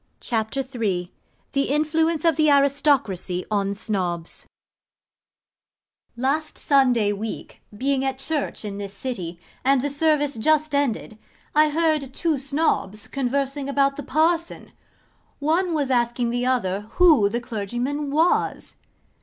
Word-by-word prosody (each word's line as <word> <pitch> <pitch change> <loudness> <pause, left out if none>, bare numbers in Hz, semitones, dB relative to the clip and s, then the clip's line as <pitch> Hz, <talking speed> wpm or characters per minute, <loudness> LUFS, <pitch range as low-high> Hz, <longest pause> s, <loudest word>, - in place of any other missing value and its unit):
CHAPTER 225 +3 -1
III 215 -9 -3 0.4
THE 275 0 0
INFLUENCE 310 +2 +1
OF 330 -2 +4
THE 305 0 +3
ARISTOCRACY 275 - +2
ON 200 -1 0
SNOBS 180 -6 -3 1.7
Last 280 +5 -1
Sunday 250 -7 +3
week, 210 +2 -6 0.2
being 270 +2 0
at 265 -1 -1
church 285 -4 -2
in 200 -1 -5
this 200 -1 -6
city, 185 -8 -5 0.2
and 265 0 +3
the 285 - -1
service 295 -2 +1
just 310 +5 +2
ended, 240 -6 -1 0.3
I 305 0 +5
heard 305 -4 0
two 320 -5 0
Snobs 275 -7 -1
conversing 275 +1 -2
about 275 0 +2
the 290 - -5
Parson. 325 +4 0 0.7
One 335 +5 +1
was 285 -3 0
asking 240 -1 +1
the 245 +1 -1
other 205 -5 0
who 310 - +6
the 235 +3 -2
clergyman 240 +5 -3
was? 320 +5 +1
270 Hz, 125 wpm, -23 LUFS, 220-295 Hz, 1.7 s, who